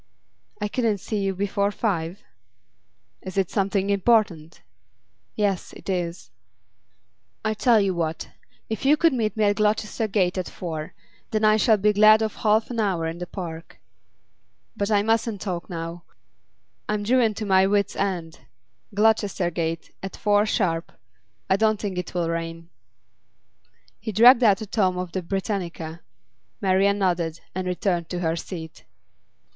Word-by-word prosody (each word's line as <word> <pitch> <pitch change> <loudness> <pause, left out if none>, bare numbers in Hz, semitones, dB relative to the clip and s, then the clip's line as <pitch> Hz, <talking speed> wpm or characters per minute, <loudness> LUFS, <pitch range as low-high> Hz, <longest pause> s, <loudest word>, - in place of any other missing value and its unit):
'I 210 - -1
couldn't 225 -3 0
see 210 +2 -3
you 195 -1 -1
before 200 +1 0
five?' 190 -4 -2 1.0
'Is 185 0 -8
it 190 -3 +1
something 195 -1 0
important?' 195 -6 +1 0.7
'Yes, 200 -3 -1
it - - -6
is.' 175 -2 -3 1.1
'I 220 - +1
tell 230 +1 +4
you 195 -2 +1
what. 165 -2 -3 0.4
If 220 -2 -4
you 290 +3 +5
could 330 -1 +3
meet 220 -3 -1
me 215 - +2
at 205 -1 +2
Gloucester 215 +1 0
Gate 190 -3 +1
at 185 - -4
four, 160 -3 -6 0.3
then 215 -1 +1
I 215 0 +5
shall 220 0 +4
be 210 +1 +2
glad 215 +1 +6
of 220 - -3
half 220 +2 +2
an 235 - -3
hour 190 -6 0
in 165 +1 -4
the 180 - -5
park. 165 -4 -8 1.0
But 200 0 -1
I 205 -2 +3
mustn't 225 -1 0
talk 180 -4 -4
now; 170 0 -6 0.8
I'm 210 -1 0
driven 230 -1 +2
to 215 - -4
my 190 -1 +4
wits' 200 0 +1
end. 175 -5 -3 0.6
Gloucester 205 -4 +2
Gate, 165 0 -3
at 195 - -6
four 205 0 +2
sharp. 165 -5 -1 0.5
I 190 - +3
don't 215 0 +2
think 195 -4 -3
it'll 175 -1 -2
rain.' 165 0 -4 1.3
He 220 +1 -4
dragged 235 +5 +7
out 205 -3 +4
a - - -3
tome 190 -3 +1
of 180 -1 -4
the 185 - -2
'Britannica.' 170 -3 -4 0.6
Marian 195 0 +2
nodded, 175 -4 0
and 185 0 -3
returned 180 -2 -1
to 180 -1 -3
her 165 -1 0
seat. 165 -2 -8
195 Hz, 150 wpm, -24 LUFS, 175-215 Hz, 1.3 s, dragged